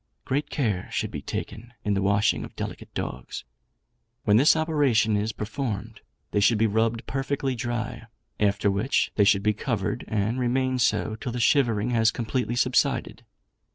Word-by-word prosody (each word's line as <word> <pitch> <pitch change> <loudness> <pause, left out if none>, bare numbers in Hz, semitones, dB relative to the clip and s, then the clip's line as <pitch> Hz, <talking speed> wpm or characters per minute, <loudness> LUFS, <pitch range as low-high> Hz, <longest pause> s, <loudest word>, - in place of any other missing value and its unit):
Great 145 +3 -1
care 105 -10 -1
should - - -2
be - - -5
taken 115 +3 -6
in 105 - +1
the 100 - 0
washing 100 +2 +2
of - - -10
delicate - - -6
dogs. - - -5 0.8
When 105 0 +4
this 140 +7 +6
operation 145 -9 +2
is 105 +2 0
performed, 110 -1 -4 0.3
they - - +2
should 110 +2 +4
be 110 - +3
rubbed 115 +2 0
perfectly 135 0 -2
dry; 120 -1 -4 0.3
after 100 -1 +2
which 100 +8 +1
they 105 - +3
should 100 -1 +4
be 105 0 +3
covered, 110 -1 -2
and 110 +3 -1
remain 130 +1 +1
so 115 -3 +1
till 125 +1 -5
the 120 - -4
shivering 120 -3 +2
has 115 -2 +4
completely 120 +1 -2
subsided. 125 0 +1
115 Hz, 160 wpm, -26 LUFS, 105-130 Hz, 0.8 s, this